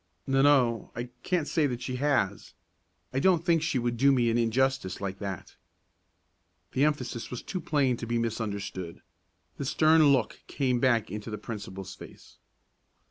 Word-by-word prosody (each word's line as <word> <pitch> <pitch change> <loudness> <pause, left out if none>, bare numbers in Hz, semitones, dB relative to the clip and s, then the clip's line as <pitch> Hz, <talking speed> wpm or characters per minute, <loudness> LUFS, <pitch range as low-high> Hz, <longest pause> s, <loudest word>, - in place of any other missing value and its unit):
"N 135 - -2
no, 135 -5 +3
I 120 +1 -5
can't 175 -5 0
say 155 -3 +2
that 125 -2 -4
she 125 +1 -3
has. 130 -9 0 0.6
I 130 - +1
don't 175 +1 +3
think 165 -2 +3
she 160 -4 0
would 120 -1 -1
do 140 +3 +5
me 120 -3 +3
an 115 - +1
injustice 120 -3 0
like 95 -1 -4
that." 100 -3 -6 1.2
The 135 - +2
emphasis 125 -6 -2
was 125 - -6
too 185 - -4
plain 135 -5 +1
to 115 - -6
be 120 +1 0
misunderstood. 100 -6 -4 0.5
The 140 - -4
stern 155 +3 +5
look 130 -6 0
came 130 -3 0
back 120 -6 +2
into 105 +2 -6
the 105 - -4
principal's 100 -4 -7
face. - - -14
125 Hz, 165 wpm, -28 LUFS, 110-140 Hz, 1.2 s, do